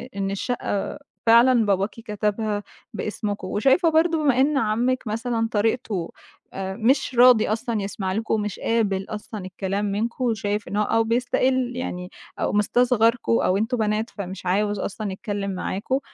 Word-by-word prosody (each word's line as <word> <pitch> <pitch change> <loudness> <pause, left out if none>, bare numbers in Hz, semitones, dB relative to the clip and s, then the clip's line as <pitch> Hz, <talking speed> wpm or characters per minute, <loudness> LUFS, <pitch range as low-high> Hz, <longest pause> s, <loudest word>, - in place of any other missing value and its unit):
إن 195 -1 -2
الشقة 205 +2 -3 0.3
فعلًا 235 0 +6
باباكِ 195 0 +1
كتبها 210 -1 -2 0.3
باسمكم، 210 -2 -4
وشايفة 270 - +3
برضه 325 +1 +3
بما 270 -4 +3
إن 285 +1 +2
عمِك 240 +2 0
مثلًا 225 +1 -1
طريقته 210 -4 -1 0.5
مش 225 +8 0
راضي 240 -2 +6
أصلًا 225 0 -1
يسمع 195 -1 -3
لكم، 220 +3 -1
ومش 210 -3 -2
قابل 200 -4 0
أصلًا 210 -2 -6
الكلام 195 +2 -3
منكم، 220 +5 -2
وشايف 210 -3 -1
إنه 205 +4 0
أو 225 +2 +2
بيِستقِل 250 +2 +1
يعني 180 -8 -4 0.3
أو - - 0
مستصغركم 230 +2 +2
أو 185 - +2
أنتم 225 +4 0
بنات 215 +1 0
فمش 190 -2 -7
عايز 205 +2 +1
أصلًا 205 +1 -4
يتكلم 200 0 -4
معاكم 195 +7 -2
215 Hz, 140 wpm, -23 LUFS, 200-240 Hz, 0.5 s, فعلًا